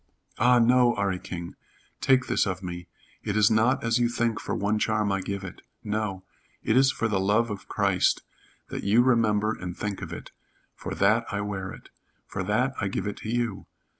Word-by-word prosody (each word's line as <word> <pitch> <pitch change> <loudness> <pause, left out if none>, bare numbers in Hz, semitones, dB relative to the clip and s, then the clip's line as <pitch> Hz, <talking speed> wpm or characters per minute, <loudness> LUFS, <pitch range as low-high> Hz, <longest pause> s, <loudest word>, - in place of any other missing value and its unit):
"Ah, 125 +2 +5
no, 120 +1 +4
'Arry 100 -2 0
King! 85 -2 -7 0.4
Take 130 -1 +3
this - - +1
of 95 0 -3
me. 90 -1 -6 0.3
It 105 0 -2
is 105 0 +5
not 110 +4 +3
as 115 +1 +2
you 120 -1 +2
think 115 -2 0
for - - -3
one 105 +2 0
charm 105 -2 +1
I 95 -1 0
give 100 +1 -4
it. 95 - -9 0.2
No. 105 -3 -2 0.4
It 110 - +1
is 130 0 +5
for 115 - -1
the 105 -3 0
love 105 +4 +2
of 100 - -7
Christ - - +1 0.5
that - - -5
you 110 +5 +4
remember 110 -4 +2
and 90 -2 -7
think 100 -2 -4
of - - -6
it. - - -8 0.4
For - - -6
that - - +2
I 100 0 -1
wear 95 -2 -4
it. - - -12 0.4
For - - -5
that 125 +6 +1
I 100 - 0
give 95 - -3
it 105 - -4
to 110 - -7
you. 115 -4 -2
105 Hz, 200 wpm, -26 LUFS, 100-115 Hz, 0.5 s, Ah